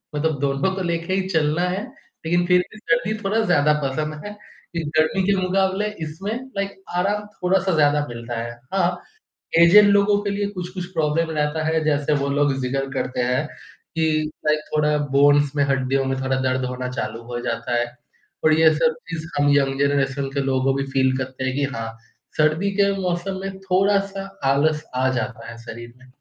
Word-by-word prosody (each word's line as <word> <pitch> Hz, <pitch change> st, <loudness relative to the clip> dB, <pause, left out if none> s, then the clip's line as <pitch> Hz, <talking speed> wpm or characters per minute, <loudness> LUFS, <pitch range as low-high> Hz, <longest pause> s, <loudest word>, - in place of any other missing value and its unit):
मतलब 150 Hz, -1 st, 0 dB
दोनों 140 Hz, +6 st, +1 dB
को 190 Hz, -, -3 dB
लेके 170 Hz, +1 st, -1 dB
ही 190 Hz, 0 st, 0 dB
चलना 160 Hz, 0 st, +1 dB
है 190 Hz, +3 st, -2 dB, 0.4 s
लेकिन 175 Hz, +2 st, +2 dB
फिर 180 Hz, 0 st, +5 dB
भी 215 Hz, -, -12 dB
सर्दी 230 Hz, -1 st, 0 dB
थोड़ा 210 Hz, +3 st, +1 dB
ज़्यादा 150 Hz, -4 st, +4 dB
पसंद 150 Hz, +3 st, -2 dB
है 205 Hz, -, -5 dB
क्योंकि 170 Hz, -6 st, -8 dB
गर्मी 170 Hz, +5 st, +2 dB
के 200 Hz, -, +4 dB
मुकाबले 190 Hz, +2 st, +1 dB, 0.2 s
इसमें 190 Hz, +8 st, -5 dB, 0.2 s
लाइक 200 Hz, 0 st, -2 dB, 0.2 s
आराम 205 Hz, +3 st, 0 dB
थोड़ा-सा 190 Hz, 0 st, +1 dB
ज़्यादा 145 Hz, -1 st, +3 dB
मिलता 115 Hz, 0 st, -6 dB
है। 120 Hz, 0 st, -5 dB, 0.2 s
हाँ। 180 Hz, -2 st, +2 dB, 0.6 s
ऐज़ड 195 Hz, +5 st, +8 dB
लोगों 200 Hz, 0 st, +4 dB
के 200 Hz, -, -1 dB
लिए 200 Hz, 0 st, -1 dB
कुछ-कुछ 180 Hz, -1 st, -5 dB
प्रॉब्लम 160 Hz, +1 st, +1 dB
रहता 150 Hz, +1 st, 0 dB
है 160 Hz, 0 st, +1 dB
जैसे 145 Hz, 0 st, +1 dB
वो 140 Hz, -, 0 dB
लोग 145 Hz, -1 st, +3 dB
ज़िक्र 135 Hz, +2 st, -2 dB
करते 125 Hz, -1 st, -2 dB
हैं 125 Hz, +5 st, 0 dB, 0.5 s
कि 160 Hz, 0 st, +2 dB, 0.4 s
लाइक 150 Hz, 0 st, +3 dB
थोड़ा 150 Hz, 0 st, +2 dB, 0.2 s
बोन्स 145 Hz, 0 st, +5 dB
में 145 Hz, -, +3 dB
हड्डियों 135 Hz, 0 st, +1 dB
में 135 Hz, 0 st, -1 dB
थोड़ा 130 Hz, 0 st, 0 dB
दर्द 130 Hz, 0 st, 0 dB
होना 125 Hz, 0 st, -4 dB
चालू 115 Hz, -2 st, -4 dB
हो 120 Hz, -, -3 dB
जाता 115 Hz, 0 st, -2 dB
है। 120 Hz, -, +1 dB, 0.6 s
पर 155 Hz, 0 st, +5 dB
ये 160 Hz, -1 st, +6 dB
सब 240 Hz, +9 st, +2 dB
चीज़ 165 Hz, -1 st, -4 dB
हम 145 Hz, 0 st, +3 dB
यंग 135 Hz, -1 st, +1 dB
जनरेशन 140 Hz, -1 st, +1 dB
के 140 Hz, -, 0 dB
लोगों 135 Hz, 0 st, +1 dB
भी 135 Hz, -, 0 dB
फ़ील 130 Hz, -1 st, +3 dB
करते 130 Hz, 0 st, -5 dB
हैं 130 Hz, -, -1 dB
कि 145 Hz, -, 0 dB
हाँ 115 Hz, 0 st, -4 dB, 0.5 s
सर्दी 155 Hz, +6 st, +2 dB
के 200 Hz, 0 st, +4 dB
मौसम 180 Hz, +1 st, -2 dB
में 195 Hz, 0 st, -6 dB
थोड़ा-सा 195 Hz, +1 st, +1 dB, 0.2 s
आलस 150 Hz, +2 st, +2 dB
आ 130 Hz, +1 st, +2 dB
जाता 120 Hz, -2 st, -5 dB
है, 115 Hz, -, -10 dB
शरीर 120 Hz, +1 st, -9 dB
में। 130 Hz, 0 st, -19 dB
155 Hz, 185 wpm, -22 LUFS, 135-185 Hz, 0.6 s, ऐज़ड